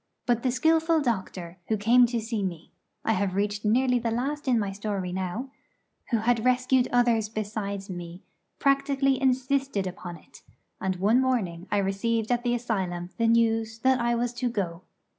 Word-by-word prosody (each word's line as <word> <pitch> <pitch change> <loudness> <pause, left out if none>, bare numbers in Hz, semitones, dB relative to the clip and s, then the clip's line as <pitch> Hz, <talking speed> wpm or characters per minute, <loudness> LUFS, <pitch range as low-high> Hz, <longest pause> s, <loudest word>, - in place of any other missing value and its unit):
But 240 -1 +1
the 255 - +1
skilful 320 +5 +3
doctor 190 - -3
who 220 - +1
came 240 +4 +5
to 235 0 -1
see 225 -1 -3
me 175 -4 -5 0.3
I - - +2
have 195 -2 -1
reached 205 +1 -1
nearly 250 +3 +3
the 235 0 -1
last 275 +6 -2
in 250 -2 +4
my 205 -3 -1
story 195 -2 -3
now 190 +8 -4 0.6
who 235 - +2
had 230 +1 +1
rescued 255 0 +3
others 235 -3 +2
besides 205 -2 -4
me, 175 -1 -8 0.3
practically 275 -1 +2
insisted 265 -4 +1
upon 180 -1 -6
it; - - -18 0.4
and 190 -1 -1
one 210 +7 +3
morning 200 -9 -1
I 205 - +1
received 215 +4 0
at 245 -1 +2
the 240 0 0
asylum 185 -7 -3
the 230 - +3
news 225 -1 +2
that 260 0 +3
I 235 0 +1
was 240 +1 -1
to 245 +1 -1
go. 185 -7 -3
225 Hz, 175 wpm, -27 LUFS, 195-250 Hz, 0.6 s, came